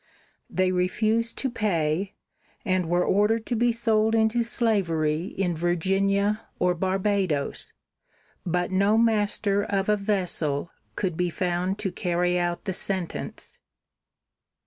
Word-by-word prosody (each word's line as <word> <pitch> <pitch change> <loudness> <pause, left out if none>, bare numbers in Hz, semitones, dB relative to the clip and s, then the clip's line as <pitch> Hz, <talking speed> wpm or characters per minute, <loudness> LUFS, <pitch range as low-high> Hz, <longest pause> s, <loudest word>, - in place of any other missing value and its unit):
They 185 +1 +1
refused 215 +6 0
to 270 - -1
pay, 190 -4 -1 0.5
and 185 -3 0
were 175 +1 +2
ordered 215 +3 +2
to 245 - -1
be 240 +1 +3
sold 225 -1 +2
into 220 +1 +2
slavery 175 -9 0
in 180 -3 0
Virginia 195 +5 +1 0.2
or 180 0 +2
Barbadoes, 190 -4 -1 0.7
but 175 +1 -1
no 200 +3 +3
master 210 -3 +2
of 195 -1 -1
a 210 - +4
vessel 180 -7 -1 0.2
could 180 -4 -2
be 180 +1 0
found 180 +2 -1
to 190 - 0
carry 180 0 0
out 175 +1 -2
the 190 - -1
sentence. 185 -1 -4
190 Hz, 125 wpm, -26 LUFS, 175-215 Hz, 0.7 s, a